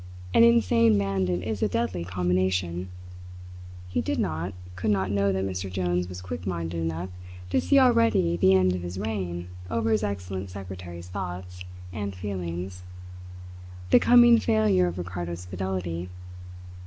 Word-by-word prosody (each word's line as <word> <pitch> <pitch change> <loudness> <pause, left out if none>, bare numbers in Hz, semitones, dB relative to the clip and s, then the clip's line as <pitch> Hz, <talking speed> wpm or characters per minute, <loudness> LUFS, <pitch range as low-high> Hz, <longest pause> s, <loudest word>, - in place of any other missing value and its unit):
An - - +7
insane 115 -1 +5
bandit 95 -3 0
is 110 -1 -3
a - - +3
deadly 95 -4 -1
combination. 90 0 0 1.0
He 90 +6 -1
did 95 -3 -2
not, 90 +2 -2 0.2
could 95 - -2
not 95 -2 +1
know 100 0 +2
that 95 0 -1
Mr. 95 0 -4
Jones 90 -1 -1
was 90 0 -8
quick 90 +1 -6
minded 85 -2 -3
enough 80 +3 -3 0.4
to - - +3
see 280 - +3
already 230 - +4
the 95 +2 +4
end 95 -1 +3
of 90 - -3
his 90 +1 -6
reign 95 -4 -3 0.2
over 115 +1 0
his 110 - +2
excellent 95 -2 -4
secretary's 90 -2 -8
thoughts 90 -1 -6 0.3
and 100 -2 -4
feelings; 90 -1 -5 1.1
the - - +8
coming 240 -1 +7
failure 105 - +3
of 90 +1 -4
Ricardo's 90 0 -5
fidelity. 90 -1 -3
95 Hz, 145 wpm, -26 LUFS, 90-100 Hz, 1.1 s, the